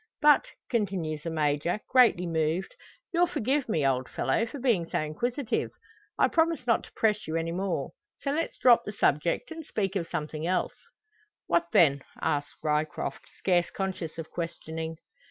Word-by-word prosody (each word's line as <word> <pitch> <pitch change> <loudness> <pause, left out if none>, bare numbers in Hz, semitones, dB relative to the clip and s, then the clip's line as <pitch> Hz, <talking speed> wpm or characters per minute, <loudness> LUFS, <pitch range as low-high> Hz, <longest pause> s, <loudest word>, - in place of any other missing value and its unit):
"But," 295 -1 +5 0.2
continues 185 - -1
the 165 - -4
Major, 155 +3 0
greatly 240 -8 +5
moved, 165 +2 -1 0.4
"you'll 350 +1 +4
forgive 265 +1 0
me, 155 -9 +1
old 130 -1 +1
fellow, 230 - 0
for 285 - -7
being 230 -11 +1
so - - 0
inquisitive? 235 - -1 0.5
I - - +5
promise 325 -5 +1
not 230 -2 +2
to - - -16
press 215 -1 +1
you 160 - -2
any 165 0 -1
more. 190 +2 -2 0.3
So 275 - -1
let's 325 +3 -2
drop 245 -2 +6
the 210 - -6
subject, 170 - +1
and 325 0 -6
speak 200 -8 -2
of 170 -4 -1
something 155 +1 -3
else." 180 0 0 0.7
"What 170 0 +2
then?" 140 -4 +5 0.2
asks 145 0 -1
Ryecroft, 150 -2 -1
scarce 175 -2 +2
conscious 185 -5 -4
of 165 -1 -7
questioning. 160 -1 -5
175 Hz, 160 wpm, -28 LUFS, 155-230 Hz, 0.7 s, drop